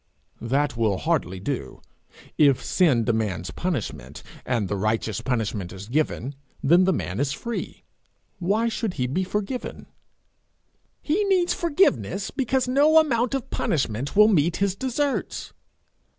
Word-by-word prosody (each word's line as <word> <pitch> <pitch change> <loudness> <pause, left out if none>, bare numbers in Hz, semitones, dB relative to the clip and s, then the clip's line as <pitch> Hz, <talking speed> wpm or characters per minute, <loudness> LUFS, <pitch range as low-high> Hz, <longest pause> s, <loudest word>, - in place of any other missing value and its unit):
'That 135 +3 0
will 110 -4 +1
hardly 135 - -1
do. 125 +7 -4 0.6
If 140 -4 +4
sin 145 -11 +3
demands 110 -6 -1
punishment, 95 - -4 0.2
and 115 -6 0
the 100 - -2
righteous 110 0 -1
punishment 110 -7 -2
is 95 +1 -9
given, 140 0 -1 0.3
then 175 +6 +5
the 190 - +3
man 100 - -3
is 140 0 0
free. 235 +9 -5 0.6
Why 205 +6 +1
should 225 -4 -2
he 125 - 0
be 145 +10 -1
forgiven?' 210 +6 -4 1.2
'He 345 +8 +1
needs 370 -3 +2
forgiveness 245 - +1
because 265 -1 0
no 290 +5 +4
amount 255 -5 +3
of 270 - -5
punishment 135 -3 -1
will 210 +1 +7
meet 170 -5 +2
his 200 -1 +1
deserts.' 265 +5 -2
155 Hz, 135 wpm, -24 LUFS, -, 1.2 s, will